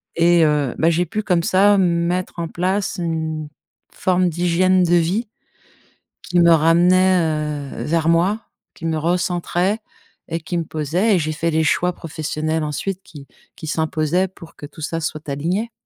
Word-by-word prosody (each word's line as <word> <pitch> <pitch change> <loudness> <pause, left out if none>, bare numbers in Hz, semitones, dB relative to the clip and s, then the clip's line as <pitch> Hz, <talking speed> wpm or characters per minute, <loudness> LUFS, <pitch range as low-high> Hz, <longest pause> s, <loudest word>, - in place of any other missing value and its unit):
Et 170 0 +4
heu, 150 -4 0
bah, 165 - +3
j'ai 170 +2 +1
pu 215 +2 -3
comme 175 -4 +1
ça, 200 +3 +4
mettre 175 -1 0
en 170 - -2
place 185 +4 -1
une 160 -2 -3 0.4
forme 185 -1 +1
d'hygiène 180 +2 +2
de 175 0 +3
vie 180 +8 +1 0.9
qui 175 - 0
me 170 0 +6
ramenait, 165 -3 +2
heu, - - -3
vers 165 0 0
moi, 180 +6 +2 0.3
qui 165 - -9
me 160 -1 0
recentrait 175 +4 0 0.5
et 165 0 -3
qui 165 +2 -4
me 170 - 0
posait 165 +8 0
et - - +2
j'ai 155 -1 -2
fait 165 +2 -1
les 160 0 +1
choix 180 +3 +1
professionnels 155 -1 -3
ensuite 180 +6 -3
qui 145 -6 -13 0.3
qui 160 - -9
s'imposaient 160 +3 0
pour 170 -2 -15
que - - -9
tout 150 +2 -12
ça 165 +2 -3
soit 155 0 -5
aligné. 175 +11 -2
170 Hz, 165 wpm, -20 LUFS, 155-180 Hz, 0.9 s, me